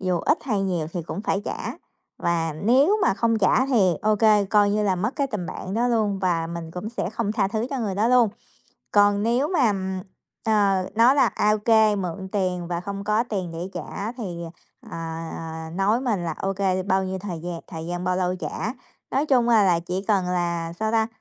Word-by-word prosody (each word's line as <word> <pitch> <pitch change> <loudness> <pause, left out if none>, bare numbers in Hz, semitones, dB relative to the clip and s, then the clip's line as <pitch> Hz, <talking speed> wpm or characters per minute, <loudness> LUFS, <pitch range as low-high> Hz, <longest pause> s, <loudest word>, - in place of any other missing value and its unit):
dù 180 -2 0
ít 300 - +2
hay 210 -7 0
nhiều 175 -5 -1
thì 175 - -3
cũng 190 - -5
phải 195 - 0
trả - - -4 0.5
và 165 -2 0
nếu 260 - +3
mà 345 - +3
không 230 0 +1
trả 245 +6 +3
thì, 205 -10 +3
ô 215 0 +3
kê, 210 -1 +4
coi 205 +1 +3
như 210 +1 +1
là 190 -3 +1
mất 215 +8 -2
cái 280 - +1
tình 210 -9 -4
bạn 190 +1 -6
đó 240 +2 +1
luôn 215 -4 +1
và 175 -3 0
mình 165 -1 -6
cũng 180 +5 -5
sẽ 230 - -3
không 220 -1 -2
tha 210 -3 +1
thứ 220 +3 -2
cho 275 - -2
người 210 -5 -2
đó 210 +4 +2
luôn. 245 -2 +5 0.6
Còn 205 0 +4
nếu 240 +6 +1
mà, 270 - +3 0.7
ờ, 200 -4 +2
nói 235 +4 +5
là, 280 - +4
à, 210 - +1
ô - - +3
kê, 215 -1 +4
mượn 190 0 -4
tiền 180 -4 -1
và 170 -1 -2
không 200 +2 -5
có 215 +2 +2
tiền 195 -7 -4
để 170 +3 -5
trả 200 +4 -5
thì, 190 -9 -6 0.4
à, - - -16
à, 165 0 -5 0.4
à, - - -10
nói 200 +6 +2
mình 220 -9 -1
là, 165 - -2
ô 195 0 0
kê, 190 -1 0
bao 190 0 +1
nhiêu 190 0 -3
thời 180 -4 -6
gian, 170 0 -5
thời 165 -2 -7
gian 175 +1 -4
bao 185 0 +1
lâu 180 0 0
trả. 205 +4 -4 0.4
Nói 280 +3 +1
chung, 250 -5 +3
à, 225 -3 +5
là 175 -3 +3
chỉ 180 +3 -4
cần 200 -4 +3
là 170 -2 -1
sao 220 +5 -2
ta? 220 -1 +3
200 Hz, 225 wpm, -24 LUFS, 180-220 Hz, 0.7 s, luôn